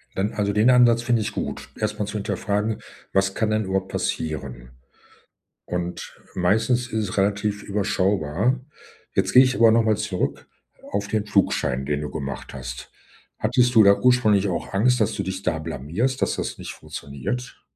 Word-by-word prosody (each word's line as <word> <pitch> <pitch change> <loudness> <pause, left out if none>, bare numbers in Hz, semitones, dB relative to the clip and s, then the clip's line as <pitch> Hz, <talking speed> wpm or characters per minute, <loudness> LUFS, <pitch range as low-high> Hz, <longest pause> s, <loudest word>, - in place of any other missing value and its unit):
Dann 100 +3 -1
also, 100 -1 0
den 105 +4 +4
Ansatz 120 -2 +5
finde 120 -2 +1
ich 105 - -2
gut, - - -5
erstmal 105 -1 -2
zu - - -6
hinterfragen, 105 +1 -1 0.3
was 95 0 +2
kann 110 - 0
denn 110 0 0
überhaupt 95 0 -2
passieren? 65 -6 -3 0.9
Und, 90 0 -5 0.2
meistens 110 +7 +2
ist 110 -3 -1
es - - -6
relativ 100 +1 0
überschaubar. 100 - 0 0.6
Jetzt 95 0 +2
gehe 130 - +9
ich 130 0 +1
aber 115 -1 +6
nochmal 110 -2 +3
zurück 105 -4 -3 0.4
auf 100 0 -1
den 105 0 -1
Flugschein, 95 -10 +1
den 75 +1 -1
du 75 - -4
gemacht 70 -3 -6
hast. 65 -1 -7 0.5
Hattest 125 +2 +2
du 110 - +8
da 100 0 +6
ursprünglich 110 -6 +3
auch 90 - -4
Angst, 125 +5 +3
dass 105 - +2
du - - -3
dich 95 +1 -5
da 85 -3 0
blamierst, 80 - -2
dass - - +1
das - - -4
nicht - - -7
funktioniert? 70 - -6
100 Hz, 165 wpm, -23 LUFS, 90-110 Hz, 0.9 s, gehe